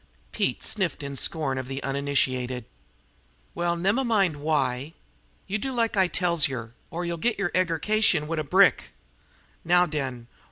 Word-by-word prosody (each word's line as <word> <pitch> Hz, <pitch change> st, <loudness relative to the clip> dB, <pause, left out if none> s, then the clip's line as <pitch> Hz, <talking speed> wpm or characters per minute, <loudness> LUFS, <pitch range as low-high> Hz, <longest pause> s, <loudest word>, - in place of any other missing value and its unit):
Pete -, -, -1 dB
sniffed 180 Hz, -8 st, -2 dB
in 140 Hz, 0 st, -5 dB
scorn 135 Hz, -2 st, -1 dB
of 130 Hz, -, -6 dB
the 135 Hz, +1 st, -5 dB
uninitiated. 130 Hz, -3 st, -1 dB, 0.9 s
"Well, 175 Hz, 0 st, 0 dB
nemmine 195 Hz, -, +1 dB
why! 145 Hz, -1 st, 0 dB, 0.5 s
You 205 Hz, +2 st, -2 dB
do 265 Hz, +5 st, -3 dB
like 230 Hz, -3 st, 0 dB
I 190 Hz, -2 st, +4 dB
tells 170 Hz, -2 st, +2 dB
yer, 120 Hz, -4 st, -6 dB, 0.2 s
or 175 Hz, +1 st, -4 dB
yer'll 170 Hz, 0 st, -3 dB
git 235 Hz, +5 st, +1 dB
yer 195 Hz, -3 st, -1 dB
eggercation 185 Hz, 0 st, +2 dB
wid 165 Hz, 0 st, -2 dB
a -, -, -1 dB
brick. 140 Hz, -, +3 dB, 0.7 s
Now 175 Hz, +1 st, +4 dB
den! 135 Hz, -7 st, -4 dB
160 Hz, 150 wpm, -26 LUFS, 135-185 Hz, 0.9 s, I